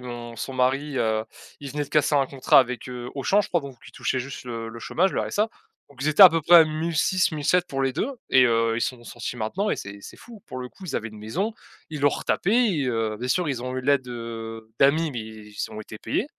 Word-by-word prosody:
mon 120 -1 -8
son 125 +4 -5
mari, 135 +3 0
heu, 110 -2 +1 0.3
il 140 -1 -8
venait 150 0 -2
de - - -15
casser 150 0 +2
un 140 -2 +3
contrat 135 0 +5
avec, 125 -1 -4
heu, 125 -1 -6
Auchan, 190 +9 +3
je 210 - -4
crois 175 - +1
donc 140 -3 -9
qu'il - - -14
touchait 130 - -1
juste 130 +1 -7
le 115 -2 -5
le 115 - -9
chômage, 185 +10 +1
le - - 0
RSA. 210 +2 0 0.4
Donc 135 -2 -10
ils 150 - +1
étaient 155 +6 +6
à 190 - +13
peu 165 -1 -1
près 175 +4 +7
à 165 - +9
1006-1007 165 +1 +1
pour 135 -4 -3
les 135 -1 0
2 225 - -1 0.2
et 130 - +6
heu, 115 -1 +2
ils - - -2
sont 125 - -2
sont 120 - -17
sortis 120 +1 -6
maintenant 190 - -1
et - - 0
c'est 100 0 -8
c'est - - -11
fou. 230 -4 -13
Pour 130 - -7
le 125 0 -6
coup, 190 - -14
ils 180 - -5
avaient 115 - -3
une 110 -1 -12
maison, 185 - -3 0.3
ils 150 -2 -6
l'ont 145 - +5
retapée 195 - -1 0.3
et - - -1
heu, 115 -3 -1
bien 125 - -4
sûr 175 +5 +1
ils 125 -4 -2
ont 130 0 -4
eu 130 - -2
l'aide, 135 -1 +2
heu, 115 -2 -7
d'amis, 155 +4 +4
mais 120 - -4
ils 110 -1 -7
ont 110 0 -7
été 110 - -9
payés. - - -2
130 Hz, 260 wpm, -25 LUFS, 115-155 Hz, 0.4 s, à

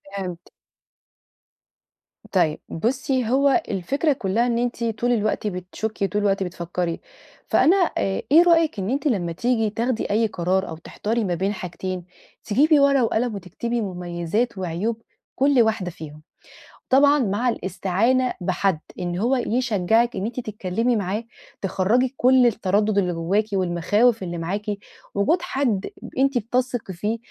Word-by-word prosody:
فهمت. 180 -3 -6 1.8
طيب، 165 -5 +2
بُصِّي، 255 - -1
هو 280 +6 +3
الفكرة 275 - 0
كلَّها 230 0 0
إن 235 -1 0
أنتِ 240 0 -2
طول 230 +2 0
الوقت 215 -1 0
بتشكِّي، 195 +2 -3
طول 210 +1 -1
الوقت 195 -1 +1
بتفكِّري. 175 -1 -3 0.5
فأنا 350 - +4 0.2
آآ، 195 - 0
إيه 330 +3 +8
رأيِك 330 -7 +3
إن 190 +1 -2
أنتِ 275 +4 0
لمّا 180 -9 0
تيجي 225 +4 0
تاخدي 230 +2 -2
أي 225 +2 +3
قرار 190 0 -1
أو 160 - -6
تحتاري 220 +7 -3
ما 180 -3 -1
بين 195 +4 -1
حاجتين، 185 -1 -5 0.4
تجيبي 290 +8 +4
ورقة 280 -2 +4
وقلم 230 0 0
وتكتبي 230 +6 -3
مميزات 180 +4 -2
وعيوب 190 +6 -2 0.3
كُل 275 -2 +4
واحدة 220 -5 0
فيهم؟ 155 -2 -10 0.7
وطبعًا 285 +2 +5
مع 230 +2 +1
الاستعانة 225 +6 0
بحد 185 -1 0 0.2
إن 175 -1 -3
هو 240 +7 +2
يشجِّعِك 235 -2 +1
إن 190 - -2
أنتِ 235 +3 -4
تتكلَّمي 220 +1 -1
معاه، 205 +2 -2 0.4
تخرِّجي 205 +7 +1
كُل 255 0 +5
التردُّد 205 -1 +1
اللي 180 -3 +2
جوَّاكِ 185 +6 0
والمخاوف 195 +5 +2
اللي 175 -1 -4
معاكِ. 195 +5 -3 0.5
وجود 260 - +2
حد، 265 - -1
آآ، - - -5
ب - - -8
أنتِ 275 -1 +2
بتثقي 245 -2 -2
فيه، 210 +6 -2
215 Hz, 145 wpm, -23 LUFS, 185-245 Hz, 1.8 s, إيه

